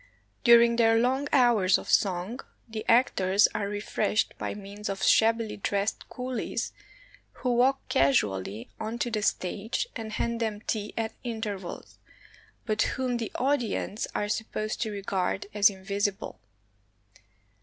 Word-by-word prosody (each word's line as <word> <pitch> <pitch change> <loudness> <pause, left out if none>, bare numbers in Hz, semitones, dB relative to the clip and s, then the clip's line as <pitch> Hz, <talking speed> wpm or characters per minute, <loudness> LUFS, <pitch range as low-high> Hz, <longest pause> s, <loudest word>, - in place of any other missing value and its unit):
During 235 -1 +6
their 225 -1 +5
long 260 +4 +1
hours 235 -9 +4
of - - -9
song, 190 +5 +1 0.3
the 220 -1 -5
actors 200 -5 +4
are 210 -1 -2
refreshed 205 +1 0
by - - -3
means 205 +1 -7
of 195 -1 -4
shabbily 225 -1 +3
dressed 200 +1 -2
coolies, 250 -1 -3 0.6
who 250 -1 -1
walk 265 +3 +2
casually 105 -6 +1
on 220 +2 -4
to 240 0 -2
the 215 -2 -1
stage 210 - -1
and 220 -2 -6
hand 235 +1 -1
them 215 -2 -2
tea 210 -2 -3
at 225 0 -2
intervals, 215 -6 -5 0.7
but 215 -2 0 0.2
whom 255 -2 0
the 230 -2 -4
audience 245 -5 -1
are 205 - 0
supposed 215 0 -3
to 220 - 0
regard 195 -1 -2
as 205 -1 +6
invisible. 200 0 -3
215 Hz, 135 wpm, -28 LUFS, 200-235 Hz, 0.7 s, During